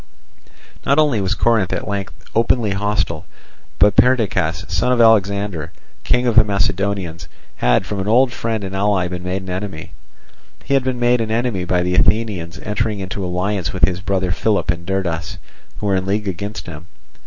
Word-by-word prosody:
Not 140 - +2
only 145 -9 +3
was 95 +2 0
Corinth 110 -4 +2
at - - -3
length 100 -2 -4 0.2
openly 115 -1 +2
hostile, 100 -4 -1 0.5
but 105 -1 +4
Perdiccas, 100 -9 +2
son 95 +7 0
of 125 - +2
Alexander, 100 -6 +2 0.3
king 125 0 +1
of 120 -3 +1
the 115 - +8
Macedonians, 100 -5 -1 0.3
had - - +2
from 105 - -4
an 95 - -3
old 120 +3 +4
friend 115 -3 -2
and 95 0 -5
ally 100 -2 +1
been 90 0 -5
made 90 +1 -3
an 95 - -6
enemy. 95 -3 -5 0.7
He - - -2
had 135 -1 +3
been 130 -1 -2
made 120 0 +3
an 110 - -2
enemy 110 -5 -1
by 90 0 +1
the 90 0 -1
Athenians 95 -3 +1
entering 105 0 -1
into 95 +1 -4
alliance 90 +1 -2
with 95 - +4
his 90 0 -3
brother 95 -1 -1
Philip 100 -1 +1
and 85 0 -7
Derdas, 90 -3 -2 0.4
who - - -6
were 100 -1 +2
in 95 0 -3
league 105 +1 -1
against 100 +3 -5
him. 85 -1 -9
100 Hz, 180 wpm, -19 LUFS, 90-110 Hz, 0.7 s, the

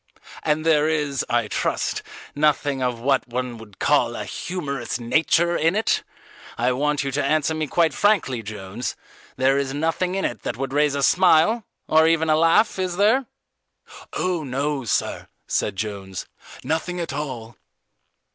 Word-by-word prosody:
"And 155 +1 0
there 155 -1 +4
is, 150 -4 0
I 120 -2 +1
trust, - - -1 0.3
nothing 145 -2 +1
of 125 -2 -1
what 135 +2 +1
one 125 -1 -4
would 105 -3 -14
call 125 -5 +2
a 105 - -4
humorous 140 - -4
nature 165 +8 +2
in 165 +4 +2
it? 220 - +1 0.6
I 120 +2 +2
want 145 +3 0
you 135 - -2
to 140 +2 0
answer 155 +2 +1
me 155 -1 -2
quite 165 +1 +2
frankly, 180 - +2
Jones, 105 +2 -5 0.4
there 135 +1 +3
is 135 -1 -2
nothing 165 +4 0
in 195 - -1
it 120 - -3
that - - -4
would 135 0 -4
raise 145 -1 +2
a 140 - -1
smile, 215 +13 +4 0.2
or 160 +1 +5
even 160 -1 +2
a - - +5
laugh, 165 +6 +3
is 180 -1 -2
there?" 225 +6 +3 0.9
"Oh, 180 -3 -1
no, 140 0 -2
sir," - - -1 0.2
said - - -1
Jones, 95 -2 -5 0.4
"nothing 175 +3 -2
at 165 -4 -3
all." 130 -6 -5
145 Hz, 160 wpm, -23 LUFS, 125-160 Hz, 0.9 s, or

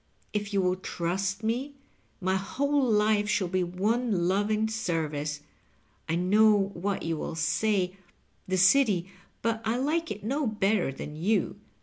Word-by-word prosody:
If 205 0 -2
you 195 -2 +1
will 180 0 +1
trust 190 +3 -2
me, 255 +6 -2 0.4
my 190 -1 0
whole 280 +9 0
life 210 -1 +3
shall 205 -3 +1
be 185 +1 0
one 195 +1 0
loving 210 +3 +1
service. 155 -8 -2 0.7
I 165 - +1
know 200 +2 +4
what 195 +2 -2
you 165 -1 -1
will 160 - -4
say 185 +3 0 0.3
— - - -25
^the 185 - +1
City; 195 -3 +4 0.3
but 225 0 0
I 225 +2 0
like 315 +5 0
it 210 0 -6
no 275 +5 0
better 205 -6 +1
than 150 +2 -7
you. 195 +8 0
200 Hz, 150 wpm, -28 LUFS, 180-220 Hz, 0.7 s, know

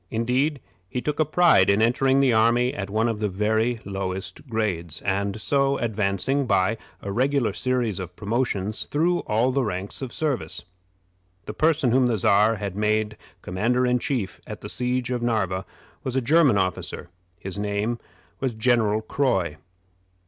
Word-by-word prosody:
Indeed, 130 +5 0 0.3
he 125 - -2
took 150 +4 -3
a 155 - +4
pride 175 - +4
in 100 +1 +4
entering 130 +4 +3
the 130 -3 +4
army 115 +3 +3
at 100 -1 -5
one 110 +3 +1
of 115 -2 -2
the 105 -1 0
very 110 +4 0
lowest 95 +3 -5
grades, 95 -8 -2
and 100 +2 -1
so 140 +4 +1
advancing, 110 +5 0
by 110 +1 +2 0.2
a 100 - -4
regular 130 +3 +1
series 125 -6 -1
of 90 -1 -7
promotions, 105 -1 -2
through 170 +4 +1
all 115 +4 +2
the 135 +1 +1
ranks 100 0 -4
of 130 - -4
the - - -7
service. 150 -5 -2 0.8
The 105 - -5
person 155 -1 +2
whom 130 +1 +4
the 115 -2 +1
Czar 105 +3 +4
had 100 -3 -5
made 105 +1 0 0.3
commander 120 +8 +1
in 125 0 +2
chief 115 -8 -2
at - - -7
the - - -7
siege 125 0 -1
of 125 -1 -1
Narva 95 -6 -1 0.4
was 130 -1 -3
a - - +4
German 140 -2 +4
officer. 95 -2 -2 0.3
His 95 +2 -5
name 105 +3 -1 0.4
was 130 -4 -2
General 110 -2 +2
Croy. 95 - 0
115 Hz, 165 wpm, -24 LUFS, 100-130 Hz, 0.8 s, a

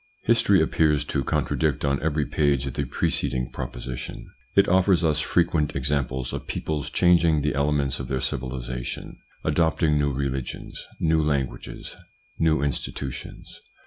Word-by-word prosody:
History - - +4
appears 75 -2 +2
to 70 - -1
contradict 75 +2 0
on 70 -1 +1
every 75 -1 0
page 70 -3 +1
the 70 +2 -2
preceding 60 0 0
proposition. 65 0 -6 0.3
It - - +5
offers 95 -1 +4
us 75 -2 +4
frequent 80 -2 +1
ex 70 +2 -1
amples 65 -3 -1
of - - -5
peoples 75 -3 -3
changing 85 -4 +4
the 75 - +1
elements 70 -1 0
of 65 - -5
their 65 0 -1
civilisation, 65 -2 -4 0.2
adopting 80 -2 +2
new 70 0 +1
religions, 65 -1 -4 0.2
new 80 -1 +3
languages, 70 -4 -3 0.4
new 80 -3 +2
institutions. 70 -2 -5
70 Hz, 135 wpm, -25 LUFS, 65-80 Hz, 0.4 s, It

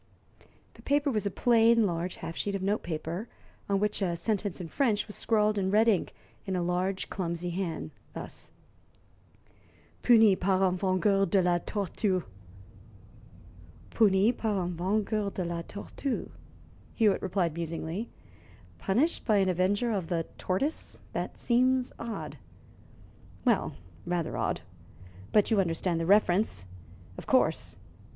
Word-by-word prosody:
The - - -16
paper 285 0 +1
was 215 -3 0
a - - +1
plain, 230 +1 +4
large 175 -1 -2
half 165 - -7
sheet 200 +3 -2
of 190 - -3
note 205 +3 +1
paper, 170 +6 -4 0.4
on 200 -1 +2
which 210 +1 0
a 175 -3 0
sentence 205 0 -1
in 175 - -5
French 215 - +1
was 210 - -10
scrawled 210 -2 +2
in 190 -1 0
red 215 +3 +4
ink 205 -6 +1 0.3
in 190 - -1
a 180 - 0
large, 180 +2 -1
clumsy 175 -1 -3
hand, 170 -4 -3 0.2
thus: - - -6 1.5
puni 225 -5 +6
par 190 +1 +1
un 185 -1 +3
vengeur 195 +1 +2
de 195 -3 +3
la 175 -1 +2
tortue. 195 -1 -1 1.7
"Puni 205 0 +4
par 215 -5 -1
un 175 0 -3
vengeur 205 +3 0
de 185 -2 -4
la 170 0 -3
tortue," 205 - -5 0.6
Hewitt 210 -4 +3
repeated 185 -4 0
musingly. 170 +5 -4 0.7
"'Punished 255 - +1
by 215 -3 +3
an 190 -1 +3
avenger 195 +6 +1
of 190 -6 -2
the 165 -2 -1
tortoise,' 270 +12 -2 0.2
That - - -3
seems 255 +1 +2
odd." 200 -10 -6 1.1
"Well, - - +2 0.3
rather 175 -2 -1
odd. - - -1 0.7
But 210 +2 +3
you 215 - +4
understand 170 -1 -1
the 165 - -2
reference, 195 - +3 0.5
of - - -11
course. - - +2
195 Hz, 140 wpm, -29 LUFS, 175-215 Hz, 1.7 s, puni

